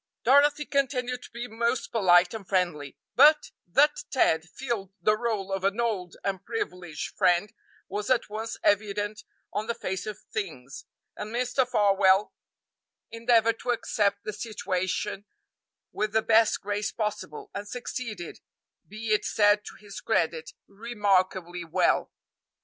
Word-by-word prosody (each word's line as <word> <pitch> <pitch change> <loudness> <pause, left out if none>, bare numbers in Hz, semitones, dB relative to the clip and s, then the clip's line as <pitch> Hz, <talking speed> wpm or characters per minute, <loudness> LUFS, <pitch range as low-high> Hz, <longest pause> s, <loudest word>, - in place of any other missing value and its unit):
Dorothy 285 +3 +4
continued 255 -3 -1
to - - -12
be 235 +1 -6
most 235 +2 -1
polite 180 -5 +4
and 210 -4 -8
friendly, 175 -7 -1 0.2
but 300 +1 +6 0.2
that 290 - +3
Ted 160 - +2
filled 225 -5 -4
the 215 - +3
role 215 -4 -2
of 195 -1 -2
an 200 +3 0
old 200 -7 -1
and 195 -1 -2
privileged 180 -8 -5
friend 180 +4 +2 0.3
was 205 +1 -4
at 255 -2 +2
once 220 +2 -5
evident 205 +1 0 0.3
on 210 +2 -2
the 235 - -1
face 190 +3 -4
of 215 - -5 0.2
things, 140 -11 -5 0.3
and 210 +1 -6
Mr. 250 +2 0
Farwell 200 -3 +3 0.8
endeavored 230 -1 +2
to - - -6
accept 205 -4 0
the 215 - -4
situation 200 -2 -3 0.7
with 215 0 -2
the 220 0 +3
best 225 0 +4
grace 205 +1 -2
possible, 210 -7 -4
and 205 +1 -5
succeeded, 230 -6 -6 0.5
be 215 +1 -2
it 210 - +2
said 205 0 +3
to - - -9
his 205 -2 -10
credit, 160 -1 0
remarkably 195 -5 0
well. 165 - +1
210 Hz, 140 wpm, -27 LUFS, 190-230 Hz, 0.8 s, but